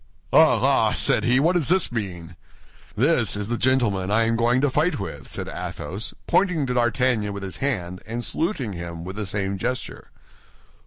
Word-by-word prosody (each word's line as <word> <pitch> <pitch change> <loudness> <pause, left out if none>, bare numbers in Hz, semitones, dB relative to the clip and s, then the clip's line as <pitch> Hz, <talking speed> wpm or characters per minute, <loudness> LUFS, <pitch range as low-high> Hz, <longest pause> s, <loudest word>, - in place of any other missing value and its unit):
"Ah, - - +6
ah!" - - +3
said - - +2
he, 125 +2 +4
"what 165 +5 +3
does 175 -6 +1
this 185 -3 +2
mean?" 90 -8 -5 0.6
"This 125 -3 +2
is 105 +1 -4
the 120 - 0
gentleman 115 -8 +1
I 110 +2 +3
am 115 0 +1
going 120 +2 +2
to 145 - +2
fight 155 +4 +1
with," 70 -9 -7
said - - -5
Athos, 100 +5 -5
pointing 180 -7 +2
to 125 - -2
D'Artagnan 120 -3 +1
with 100 0 -6
his 95 -3 -5
hand 90 -10 -2
and 115 +1 -4
saluting 150 - -1
him 85 -1 -7
with 95 +2 -7
the 105 -2 -4
same 100 -1 -2
gesture. 125 +5 -4
115 Hz, 180 wpm, -23 LUFS, 95-130 Hz, 0.6 s, Ah